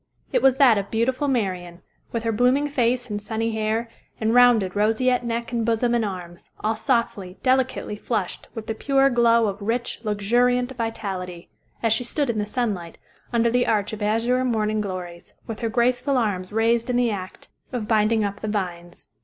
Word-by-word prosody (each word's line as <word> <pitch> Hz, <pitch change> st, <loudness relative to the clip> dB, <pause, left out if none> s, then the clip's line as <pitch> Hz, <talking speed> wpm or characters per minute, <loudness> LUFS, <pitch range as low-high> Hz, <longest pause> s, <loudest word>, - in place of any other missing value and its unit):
It -, -, +3 dB
was 265 Hz, -1 st, +4 dB
that 245 Hz, -7 st, +6 dB
of 200 Hz, 0 st, -5 dB
beautiful 255 Hz, +5 st, 0 dB
Marian, 185 Hz, -8 st, -2 dB, 0.3 s
with 230 Hz, -1 st, -2 dB
her 230 Hz, -, 0 dB
blooming 250 Hz, +6 st, +2 dB
face 250 Hz, -3 st, 0 dB
and 205 Hz, 0 st, -3 dB
sunny 225 Hz, +1 st, -2 dB
hair, 220 Hz, +1 st, -1 dB, 0.3 s
and 220 Hz, +1 st, +1 dB
rounded 240 Hz, -7 st, +5 dB
roseate 225 Hz, +5 st, +2 dB
neck 235 Hz, 0 st, -3 dB
and 235 Hz, -2 st, 0 dB
bosom 230 Hz, +1 st, +1 dB
and 235 Hz, -1 st, +2 dB
arms, 180 Hz, -4 st, -6 dB
all 220 Hz, +1 st, 0 dB
softly, 215 Hz, -5 st, -1 dB
delicately 260 Hz, -4 st, +1 dB
flushed 210 Hz, -3 st, -3 dB
with 225 Hz, -1 st, -6 dB
the 225 Hz, -, -2 dB
pure 275 Hz, +4 st, +2 dB
glow 235 Hz, -1 st, +4 dB
of 200 Hz, 0 st, -3 dB
rich, 235 Hz, +4 st, -2 dB
luxuriant 245 Hz, +5 st, +1 dB
vitality, 190 Hz, -7 st, -5 dB, 0.3 s
as 225 Hz, -1 st, +4 dB
she 225 Hz, -, 0 dB
stood 275 Hz, +1 st, 0 dB
in 220 Hz, -, -3 dB
the 205 Hz, -, -2 dB
sunlight, 205 Hz, -8 st, -3 dB, 0.3 s
under 235 Hz, -1 st, +2 dB
the 245 Hz, +1 st, +2 dB
arch 210 Hz, -1 st, 0 dB
of 215 Hz, -, -6 dB
azure 230 Hz, +4 st, +1 dB
morning 215 Hz, -3 st, 0 dB
glories, 180 Hz, -3 st, -7 dB
with 225 Hz, -2 st, -6 dB
her 230 Hz, -, -1 dB
graceful 250 Hz, +4 st, +1 dB
arms 200 Hz, -6 st, -1 dB
raised 230 Hz, +2 st, +1 dB
in 250 Hz, -, +1 dB
the 245 Hz, -2 st, +2 dB
act 185 Hz, -2 st, -7 dB, 0.2 s
of 240 Hz, -5 st, -3 dB
binding 220 Hz, 0 st, +3 dB
up 200 Hz, -1 st, -3 dB
the 215 Hz, -, -3 dB
vines. 175 Hz, -4 st, -4 dB
225 Hz, 185 wpm, -23 LUFS, 205-245 Hz, 0.3 s, that